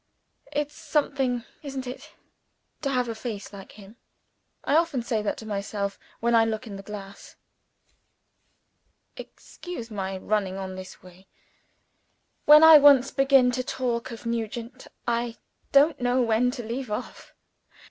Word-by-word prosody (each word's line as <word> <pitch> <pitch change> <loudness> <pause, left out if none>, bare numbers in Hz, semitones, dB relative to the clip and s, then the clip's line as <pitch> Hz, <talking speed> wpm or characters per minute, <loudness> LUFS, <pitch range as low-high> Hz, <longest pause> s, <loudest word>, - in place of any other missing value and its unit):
It's 295 0 -2
something 270 -6 -1 0.2
isn't 270 -3 -6
it? 250 +1 -9 0.7
to 280 - -1
have 250 -2 0
a 230 - -3
face 220 -3 -7
like 195 -1 -11
him. 205 +2 -15 0.7
I 285 - +1
often 320 -7 +1
say 225 -2 -1
that 210 - -2
to 220 - -9
myself 200 -1 -4 0.2
when 235 +1 +1
I 230 -1 +6
look 225 +1 -2
in 210 -3 -8
the 195 - -8
glass. 195 -1 -10 1.8
Excuse 290 -11 -9
my 195 -2 -4
running 195 -1 -1
on 190 -1 -5
in - - -8
this 185 0 -10
way. 185 +1 -17 1.2
When 300 +1 +9
I 320 -1 +10
once 275 -2 +6
begin 270 -2 +4
to 255 +1 -2
talk 245 -1 -2
of 230 -1 -9
Nugent, 230 +1 -4 0.2
I 235 0 -1 0.3
don't 285 +1 +4
know 245 +1 +2
when 230 +2 +2
to 250 -1 -5
leave 240 +2 -5
off." 210 +4 -7
235 Hz, 145 wpm, -26 LUFS, 210-265 Hz, 1.8 s, I